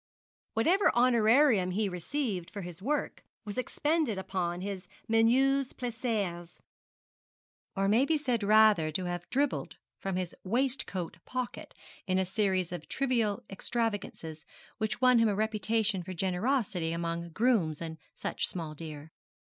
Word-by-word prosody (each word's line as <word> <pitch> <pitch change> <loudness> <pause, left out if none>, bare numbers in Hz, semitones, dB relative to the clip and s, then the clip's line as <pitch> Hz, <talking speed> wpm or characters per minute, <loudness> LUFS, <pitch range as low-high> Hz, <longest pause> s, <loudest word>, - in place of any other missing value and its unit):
Whatever 345 - +4
honorarium 240 -3 +5
he 205 +3 0
received 190 - -3
for 205 - -6
his 175 0 -8
work 290 +8 -2 0.2
was 205 -1 -5
expended 295 -2 0
upon 180 -2 -2
his 190 -2 -5 0.2
menus 255 +4 +3
plaisirs 220 -8 -3 1.2
or 195 0 +1
may 225 +7 +4
be 320 +1 +2
said 250 -6 0
rather 210 -5 +5
to 180 +4 -2
have 175 -1 -4
dribbled 280 +1 0 0.2
from 195 -1 -3
his 185 -1 -2
waistcoat 230 -6 -1
pocket 255 -1 -5 0.3
in 185 0 +2
a 190 - +2
series 185 -2 0
of 175 - -7
trivial 240 -4 0
extravagances 200 -7 -3 0.4
which 220 +3 -2
won 250 -2 +6
him 230 -1 +4
a 205 - 0
reputation 215 -1 0
for 185 +2 -6
generosity 185 -2 0
among 170 0 -3
grooms 190 -6 +2
and 160 -1 -6 0.2
such - - -1
small 165 -4 -4
deer. 155 0 -8
205 Hz, 135 wpm, -30 LUFS, 180-245 Hz, 1.2 s, won